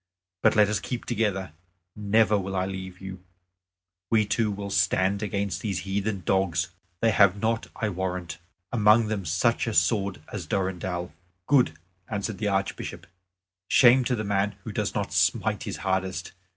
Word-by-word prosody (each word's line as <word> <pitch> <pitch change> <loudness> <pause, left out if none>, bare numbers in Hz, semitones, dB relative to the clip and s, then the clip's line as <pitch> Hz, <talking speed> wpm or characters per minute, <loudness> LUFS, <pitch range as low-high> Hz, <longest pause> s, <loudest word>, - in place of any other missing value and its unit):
But - - +4
let 105 -1 +6
us 105 0 0
keep 125 -2 -5
together; 100 -7 -1 0.4
never 105 0 +3
will 95 -1 -2
I 95 0 +1
leave 95 -1 -6
you; 95 -1 -8 0.9
we 110 -2 +3
two 110 +1 +1
will 100 -1 -5
stand 95 +1 +2
against 100 -2 -2
these 100 -5 -2
heathen 100 0 -2
dogs. 95 -2 +1 0.3
They 115 - +4
have 100 -1 +5
not, 115 +1 0
I 110 - -1
warrant, 90 -3 -4 0.3
among 110 -1 +4
them 100 -4 -2
such 115 - +1
a 110 - -2
sword 100 -6 +2
as 95 -7 -5
Durendal." 90 -1 -2 0.3
"Good," 125 - +3 0.3
answered 100 -1 -3
the 105 - -1
Archbishop. 95 -3 -2 0.6
"Shame 125 +2 +6
to 125 - +1
the 110 - -3
man 100 0 0
who - - -6
does - - -2
not - - -2
smite - - +1
his - - -4
hardest. 95 -2 -1
100 Hz, 160 wpm, -26 LUFS, 95-110 Hz, 0.9 s, let